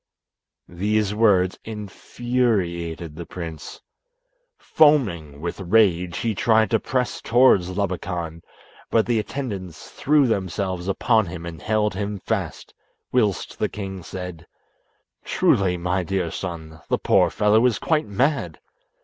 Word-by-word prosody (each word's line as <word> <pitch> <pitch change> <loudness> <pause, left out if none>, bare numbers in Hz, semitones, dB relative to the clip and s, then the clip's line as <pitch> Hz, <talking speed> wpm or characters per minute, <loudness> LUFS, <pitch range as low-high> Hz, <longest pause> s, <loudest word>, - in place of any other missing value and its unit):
These 105 +3 0
words 100 -4 +3
infuriated 100 -6 -2
the 85 +1 -7
prince. 80 -3 -8 0.8
Foaming 95 - +2
with 85 +3 -4
rage, 90 -3 +2
he 115 -1 -1
tried 110 +1 +2
to 115 - +3
press 125 +1 -2
towards 115 -7 +4
Labakan, 90 -4 -3 0.5
but 115 -1 +3
the 120 -2 +1
attendants 100 - -6
threw 145 0 +3
themselves 95 -4 -2
upon 110 +1 +2
him 85 -1 -7
and 80 -2 -8
held 110 -1 +1
him 100 +1 -3
fast, - - -4 0.4
whilst 110 -6 0
the - - 0
king 95 -2 -6
said, 90 -2 -8 0.8
"Truly, 90 -2 +2
my 90 +2 -1
dear 90 -1 -2
son, 80 -3 -6
the - - +2
poor - - +3
fellow 105 +2 +3
is 115 -5 0
quite 155 -7 0
mad. 135 +8 0
95 Hz, 125 wpm, -23 LUFS, 85-110 Hz, 0.8 s, towards